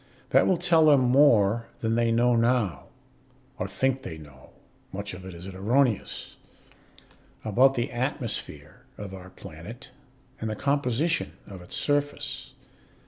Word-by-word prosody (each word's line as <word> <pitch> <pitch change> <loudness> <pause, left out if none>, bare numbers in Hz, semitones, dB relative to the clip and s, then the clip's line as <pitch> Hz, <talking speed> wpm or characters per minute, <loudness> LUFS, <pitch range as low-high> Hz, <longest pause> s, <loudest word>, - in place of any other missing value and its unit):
That - - +5
will 185 - +3
tell 165 -1 +4
them 145 -3 +6
more 120 -4 +4
than 110 0 0
they 115 0 +2
know 120 +1 +3
now 115 -5 +1 0.7
(or - - -1
think 130 0 0
they 80 -11 -7
know; 70 -4 -14 0.4
much 100 +1 -5
of 90 +1 -9
it 95 -2 -8
is 85 +1 -10
erroneous) 110 +5 0 1.1
about 130 +6 +4
the 120 +3 -1
atmosphere 125 -2 -4 0.2
of 100 -2 -7
our 95 -1 -9
planet 95 +8 -11 0.5
and 110 - -3
the 110 - -3
composition 140 +5 0
of 95 -3 -10
its 90 - -8
surface. 145 0 -2
115 Hz, 140 wpm, -27 LUFS, 95-135 Hz, 1.1 s, them